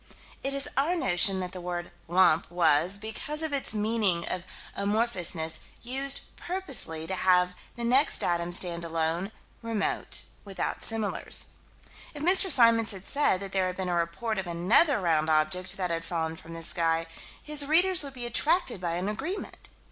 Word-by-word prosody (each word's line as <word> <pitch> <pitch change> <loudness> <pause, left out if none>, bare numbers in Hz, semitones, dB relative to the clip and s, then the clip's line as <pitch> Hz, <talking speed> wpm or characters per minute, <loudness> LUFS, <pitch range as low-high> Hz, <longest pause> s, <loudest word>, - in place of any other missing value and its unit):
It 275 +1 -1
is 275 +1 0
our 295 +7 +2
notion 190 - +2
that 180 -1 -4
the 185 - -8
word 175 0 -5 0.2
"lump" 170 -2 +3
was, 175 +1 +2
because 220 +9 -5
of 315 -2 -2
its 270 -5 0
meaning 210 -5 +1
of 180 -1 -4 0.3
amorphousness, 190 -7 -1 0.2
used 270 +3 -1
purposely 275 - -4
to 190 - -4
have 180 -1 +3 0.2
the 240 - -5
next 255 +5 +3
datum 175 0 0
stand 175 -1 -1
alone, 165 +4 -1 0.3
remote, 225 -3 -2 0.2
without 195 -2 -4
similars. 225 -2 +1 0.7
If 295 - -6
Mr. 375 +2 +5
Symons 230 -2 +5
had 190 -1 -10
said 280 -10 +1
that 195 -1 -6
there 190 -1 +1
had 185 - -5
been 190 -1 -2
a - - 0
report 175 +6 -1
of 190 - -4
another 205 - +3
round 160 -4 +1
object 155 +4 +1
that 180 -3 -2
had 165 0 -2
fallen 165 -1 -2
from 165 +1 -10
the 165 - -7
sky, 165 0 0 0.3
his 300 -2 0
readers 355 +3 +5
would 280 -1 -7
be 245 -2 -4
attracted 260 - +1
by 170 -2 -2
an 180 +3 -2
agreement. 275 - -5
190 Hz, 170 wpm, -28 LUFS, 170-250 Hz, 0.7 s, Mr